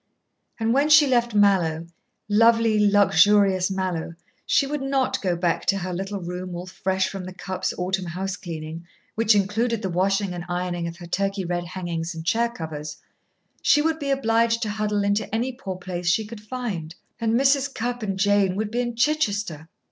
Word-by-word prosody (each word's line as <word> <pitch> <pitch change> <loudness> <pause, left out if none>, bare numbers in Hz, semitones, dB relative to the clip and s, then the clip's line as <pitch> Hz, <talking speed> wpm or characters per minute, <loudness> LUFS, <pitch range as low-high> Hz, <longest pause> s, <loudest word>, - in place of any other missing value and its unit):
And 225 +1 +1
when 280 +3 +2
she 305 -1 +8
left 240 -4 +1
Mallowe 180 -6 +3 0.4
lovely, 220 -1 +4
luxurious 200 -1 +4
Mallowe 185 -4 -3 0.3
she 280 - +3
would 295 +1 -3
not 270 -1 0
go 180 -3 0
back 170 -1 -1
to 195 - +3
her 185 -1 -4
little 195 +3 -4
room 180 0 -6
all 175 +1 -6
fresh 190 0 -1
from 195 -1 -6
the 185 - -7
Cupps' 185 0 -3
autumn 185 0 -2
house 190 +3 -3
cleaning, 165 -2 -7 0.3
which 225 -1 +3
included 220 +3 0
the 190 - -2
washing 195 +2 +1
and 175 -1 -5
ironing 175 -1 -2
of 170 0 -7
her 175 - -10
Turkey 195 +2 -1
red 175 0 -2
hangings 170 -2 -4
and 160 0 -7
chair 235 +6 +2
covers; 155 -7 -7 0.6
she 295 - +4
would 320 0 0
be 285 -2 -3
obliged 230 -3 +2
to 215 - -2
huddle 210 -1 -1
into 205 +2 0
any 245 +3 0
poor 200 -7 -6
place 180 -1 -5
she 215 +5 +2
could 215 0 -9
find. 210 -9 -5 0.2
And 225 -1 +1
Mrs. 275 0 +3
Cupp 245 0 -3
and 195 -3 -2
Jane 200 -1 +2
would 210 +1 -2
be 240 +1 0
in 240 -1 -3
Chichester. 205 - 0
200 Hz, 185 wpm, -24 LUFS, 180-230 Hz, 0.6 s, she